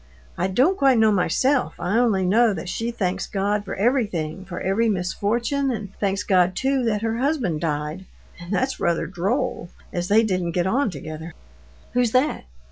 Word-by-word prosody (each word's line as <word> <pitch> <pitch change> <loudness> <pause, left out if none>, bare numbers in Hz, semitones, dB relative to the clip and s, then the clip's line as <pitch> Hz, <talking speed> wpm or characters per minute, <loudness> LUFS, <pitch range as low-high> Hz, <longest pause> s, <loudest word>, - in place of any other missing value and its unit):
"I 180 - 0
don't 265 - +2
quite 270 -3 +4
know 220 -1 +5
myself. 210 - +1
I 200 +6 0
only 210 -6 +2
know 220 +3 +3
that 175 +1 -6
she 230 +5 -2
thanks 195 -5 -2
God 205 +1 -1
for 195 - -5
everything, 195 - 0
for 180 -1 -6
every 220 +5 +1
misfortune, 225 +8 0
and 205 -5 -4
thanks 200 0 0
God 185 -2 +3
too 270 +2 +1
that 215 -2 0
her 225 0 -1
husband 255 - 0
died. 150 +3 -3 0.3
And 175 +1 -9
that's 260 +6 0
rather 170 -1 +1
droll, 195 - -2 0.2
as 175 0 -2
they 215 +3 +5
didn't 185 -5 -1
get 175 0 +1
on 240 +6 +1
together." 155 0 -8 0.6
"Who's 245 -2 +1
that? 255 - +1
200 Hz, 175 wpm, -23 LUFS, 180-240 Hz, 0.6 s, know